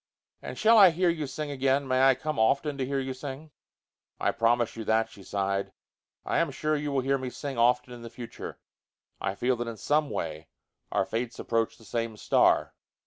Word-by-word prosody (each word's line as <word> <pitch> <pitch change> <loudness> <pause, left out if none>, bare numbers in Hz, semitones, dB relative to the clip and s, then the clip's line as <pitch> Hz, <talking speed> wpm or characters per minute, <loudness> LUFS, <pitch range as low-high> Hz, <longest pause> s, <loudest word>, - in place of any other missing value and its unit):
"And - - -7
shall 225 +1 +6
I 195 -3 +10
hear 175 +2 +1
you 155 -3 -3
sing 145 +2 -5
again? 135 0 +1
May 130 0 +2
I 135 -1 +6
come 155 +1 -3
often 140 +6 +2
to 130 - 0
hear 140 0 -1
you 130 0 -3
sing?" 140 +3 -8 0.7
"I - - +2
promise 115 0 +1
you 115 - -5
that," 110 +1 +1
she 100 - -14
sighed. 100 0 -2 0.5
"I - - +1
am - - +1
sure 155 0 -1
that 145 - -2
you 150 -1 -2
will 135 -1 +1
hear 135 +1 +1
me 130 -1 -4
sing 135 0 -5
often 125 +1 +2
in 120 - -10
the 115 - -8
future. 120 0 -8 0.6
I 95 - -2
feel 125 +4 +1
that 120 0 -3
in 115 -1 -5
some 150 +5 +1
way 80 - -4 0.4
our - - +1
fates 115 +3 -3
approach 115 -1 -1
the 115 - -17
same 115 0 -3
star." - - +3
130 Hz, 210 wpm, -28 LUFS, 115-145 Hz, 0.7 s, I